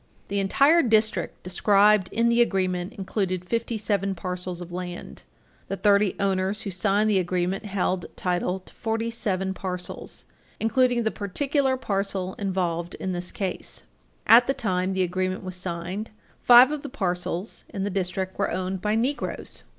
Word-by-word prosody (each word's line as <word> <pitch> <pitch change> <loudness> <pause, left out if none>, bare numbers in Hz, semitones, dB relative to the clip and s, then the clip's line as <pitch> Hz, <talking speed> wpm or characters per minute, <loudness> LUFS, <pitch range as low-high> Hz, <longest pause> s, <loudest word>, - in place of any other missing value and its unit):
The 200 0 0
entire 280 - +4
district 220 - +1
described 200 +2 +4
in 230 +1 +2
the 235 0 +4
agreement 185 -3 0
included 190 -3 -2
fifty 230 +2 -1
seven 200 -2 0
parcels 180 0 -5
of 175 0 -8
land. 175 0 -6 0.5
The 195 - -3
thirty 200 -1 +3
owners 195 +1 0
who 200 - -4
signed 200 +3 +1
the 205 -3 +3
agreement 180 +3 -1
held 185 -2 -1
title 180 0 -1
to - - -16
forty 225 0 -2
seven 190 -4 -1
parcels, 180 -2 -6 0.3
including 245 +1 +2
the 220 - 0
particular 265 - 0
parcel 195 -5 -2
involved 180 -3 -2
in 190 - -4
this 180 0 -3
case. 190 -3 -4 0.4
At 240 +2 +7
the 270 - +1
time 185 -3 -1
the 190 0 +1
agreement 185 +1 -2
was 185 -1 -5
signed, 180 +3 -4 0.3
five 245 +3 +8
of 300 -1 -3
the 285 - -7
parcels 180 -4 -3
in 195 -4 -4
the 200 - -2
district 185 0 -2
were - - +1
owned 185 0 -3
by 210 +1 +1
Negroes. 255 +6 -2
195 Hz, 160 wpm, -25 LUFS, 185-220 Hz, 0.5 s, five